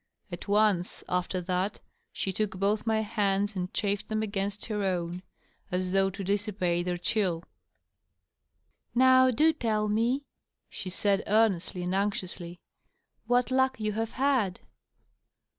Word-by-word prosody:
At 175 - -7
once, 205 -3 +2
after 180 +1 -1
that, 185 +3 -1 0.3
she 190 - -3
took 200 -1 -2
both 205 +3 0
my 220 -1 +2
hands 205 -1 0
and 180 -1 -3
chafed 200 -1 -1
^em 215 0 -1
against 200 -1 -3
her 210 -2 -2
own, 180 -2 -1 0.5
as 180 0 -1
though 195 0 +3
to 195 +1 -6
dissipate 190 -3 0
their 180 -1 -1
chill. 175 -3 0 0.8
" - - -46
Now 260 +1 +6
do 310 +7 +4
tell 215 -7 0
me," 230 +6 +1 0.5
she 185 - -5
said, 200 +2 +1
earnestly 195 -4 +2
and 180 +1 -2
anxiously, 185 -3 -2 0.3
" - - -48
what 245 +1 +2
luck 260 -1 +2
you 215 -1 0
have 225 +2 -3
had." 255 -9 +1
200 Hz, 140 wpm, -29 LUFS, 185-220 Hz, 0.8 s, Now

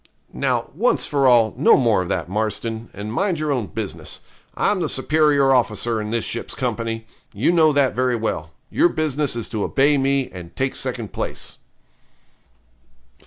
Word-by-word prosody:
Now, - - -1
once - - +1
for 140 -2 +2
all, 115 -3 +5
no 135 - +5
more 115 -7 +3
of 90 - -5
that, 85 -3 -1
Marston, 110 +3 -3
and 105 +2 -6
mind 190 +3 0
your 155 -1 -1
own 125 -7 -1
business. 80 - -6 0.4
I'm 205 - +2
the 160 - -1
superior 145 -1 +3
officer 120 -2 +1
in 105 - -4
this 115 0 -1
ship's 115 - -4
company 115 -3 -3 0.3
you 110 +11 +2
know 160 -3 +5
that 140 -2 +2
very 125 0 +1
well 95 -9 -3 0.2
your 175 - +4
business 150 -5 -1
is 115 - -3
to 110 -4 -2
obey 140 +1 +3
me, 135 0 +1
and 85 -2 -10
take 135 0 -1
second 120 -5 -3
place.' - - -5
125 Hz, 165 wpm, -21 LUFS, 110-140 Hz, 0.4 s, all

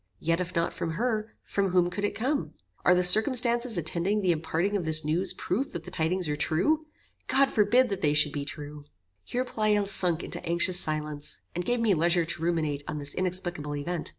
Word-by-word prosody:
Yet 165 - -1
if 180 0 -6
not 170 0 0
from 165 - -4
her, 220 +2 -2
from 195 -1 -1
whom 180 -1 +2
could 200 +3 -5
it 205 - -1
come? 275 +5 -2 0.3
Are 180 - +5
the 180 - +2
circumstances 235 +3 +4
attending 170 +5 -1
the 185 -3 +2
imparting 170 +4 -1
of 195 - -1
this 155 -1 +2
news 170 +4 0
proof 195 +8 -3
that 170 -2 -6
the - - -10
tidings 175 +2 -1
are 150 - -1
true? 300 - 0 0.4
God 275 0 +2
forbid 240 +4 +3
that 195 -2 -4
they 150 -1 +1
should 150 -1 +4
be 145 -1 -4
true." 145 +1 -9 0.4
Here 250 +1 -3
Pleyel 215 -4 0
sunk 180 -4 +4
into 175 - -5
anxious 175 +2 +3
silence, 150 -2 0
and 175 - -3
gave 245 0 0
me 220 -3 +3
leisure 170 +1 +2
to 160 0 -3
ruminate 155 -4 -1
on 150 - -4
this 145 -1 -1
inexplicable 175 -5 -2
event. 160 +3 -4
175 Hz, 205 wpm, -27 LUFS, 160-205 Hz, 0.4 s, Are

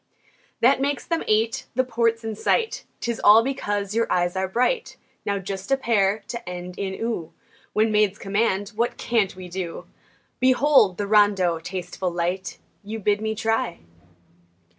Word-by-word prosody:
That 265 +3 +4
makes 285 +1 -1
them 335 -1 -1
eight. 220 +2 +1
The 255 - +3
port's 230 -2 0
in 220 -1 -4
sight 450 - 0 0.2
'Tis 235 -1 -2
all 215 +2 +8
because 205 -6 -2
your 230 +1 0
eyes 175 0 +1
are 190 0 0
bright! 250 - 0 0.3
Now 200 - +1
just 195 +3 -6
a 270 - +4
pair 210 -4 +1
to 235 -5 -5
end 180 0 -7
in 190 -1 -2
"oo" 225 -8 -3 0.4
When 215 +1 +2
maids 210 -2 +2
command, 200 -1 0
what 230 +3 -2
can't 220 -6 0
we 185 -1 -9
do? 175 -1 -5 0.5
Behold! 255 -6 +4
the 205 - -1
rondeau, 200 -5 +3
tasteful, 180 +1 -4
light, 175 +2 -3 0.3
You 215 +2 -5
bid 205 0 +1
me 220 0 -2
try! 225 -3 -1
210 Hz, 160 wpm, -24 LUFS, 190-230 Hz, 0.5 s, all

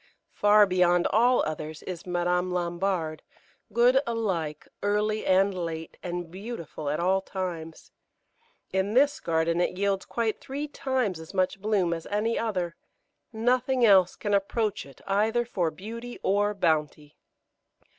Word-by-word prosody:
Far 210 0 +6
beyond 180 -2 +3
all 245 +4 +4
others 155 0 -5
is 180 -1 -7
Madame 180 0 0
Lambard, 175 -2 -1 0.5
good 245 +4 +4
alike 185 -10 -2
early 210 +1 0
and 195 +1 +4
late, 165 -3 -5
and 175 -1 -5
beautiful 185 -7 -6
at 150 - -1
all 190 +2 +2
times. 175 -5 -6 0.8
In 190 +3 0
this 285 +2 +4
garden 165 +1 +1
it 180 - -1
yields 195 -1 0
quite 230 -2 -1
three 285 +3 -4
times 260 - -1
as 160 +4 -11
much 185 +1 0
bloom 200 -5 +1
as 165 -1 -6
any 215 +3 0
other; 185 -7 -2 0.6
nothing 245 +2 +2
else 190 -4 +5
can 205 - -2
approach 200 -1 0
it 135 - -16
either 220 +4 +1
for 180 -8 -1
beauty 230 +9 -8
or 205 +2 +2
bounty. 155 -4 -1
190 Hz, 135 wpm, -27 LUFS, 170-220 Hz, 0.8 s, Far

